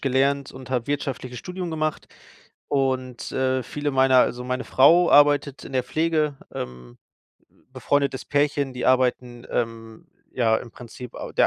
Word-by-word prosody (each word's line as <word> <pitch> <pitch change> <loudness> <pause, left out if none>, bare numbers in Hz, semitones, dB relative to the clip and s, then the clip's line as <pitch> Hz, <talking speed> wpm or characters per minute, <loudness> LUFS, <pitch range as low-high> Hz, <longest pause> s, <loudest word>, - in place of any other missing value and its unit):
gelernt 135 +1 +1
und 130 -1 -11
habe 125 -3 -1
wirtschaftliches 135 -3 -3
Studium 180 -1 -5
gemacht. 155 -1 -2 0.6
Und, 130 -3 -1
äh, 130 -1 0
viele 145 0 -3
meiner 130 -1 +4
also, 125 0 +1
meine 125 0 -2
Frau 170 +6 +5
arbeitet 145 -1 +4
in - - -10
der 130 -1 +1
Pflege, 155 -1 0 0.2
ähm, 60 -1 -7 0.8
befreundetes 140 -2 0
Pärchen, 145 -1 0
die 125 -1 -3
arbeiten, 125 -1 +1
ähm, 115 -1 -4 0.3
ja, 115 -3 +2
im 120 - -10
Prinzip 120 +1 -11
a - - -7
der - - +4
130 Hz, 145 wpm, -24 LUFS, 125-145 Hz, 0.8 s, Frau